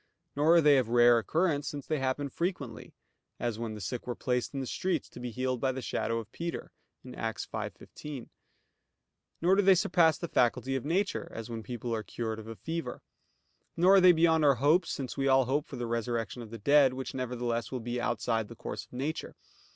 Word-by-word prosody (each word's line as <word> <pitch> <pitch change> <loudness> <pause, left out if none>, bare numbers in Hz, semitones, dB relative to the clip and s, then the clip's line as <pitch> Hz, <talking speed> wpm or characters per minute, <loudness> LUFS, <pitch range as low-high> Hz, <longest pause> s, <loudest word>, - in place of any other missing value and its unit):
Nor 155 +4 +4
are 170 - +7
they 145 -3 +6
of 120 -3 -2
rare 120 0 +6
occurrence, 150 - 0
since 145 -2 -5
they 155 -2 -1
happen 135 +2 -1
frequently; 140 - -4 0.4
as 115 -2 -2
when 115 -2 -4
the - - -8
sick 115 +6 -5
were 120 - -2
placed 125 -1 -1
in 140 - -4
the 135 - -3
streets, 185 +7 -2
to - - -11
be 125 0 -4
healed 130 +1 -2
by 135 - +2
the 130 - -5
shadow 115 +1 -1
of 115 -2 -6
Peter 170 0 -5 0.4
(Acts 115 -2 -4
5:15). 145 -5 -7 1.1
Nor 185 +3 +5
do - - +5
they 190 -1 +6
surpass 170 -2 +3
the 170 - -4
faculty 130 0 +1
of 130 - -2
nature; 190 +6 -1
as 115 +1 -6
when 115 -1 -4
people 120 0 -5
are 110 - -1
cured 110 0 -4
of 110 - -10
a 115 - -7
fever. 165 +7 -5 0.7
Nor 185 +3 +6
are - - +6
they 180 0 +8
beyond 160 -1 +3
our 140 -2 +5
hopes, 155 +8 +3
since 130 -1 -4
we 135 0 +1
all 135 -1 +5
hope 145 +4 0
for - - -8
the 120 - -3
resurrection 115 0 -2
of 115 - -9
the 115 - -7
dead, 140 +4 +4
which 130 0 -5
nevertheless 120 -2 -2
will 130 - -3
be 120 +1 -3
outside 115 -2 -1
the - - -11
course - - -6
of - - -25
nature. 140 +5 -4
130 Hz, 215 wpm, -30 LUFS, 120-155 Hz, 1.1 s, they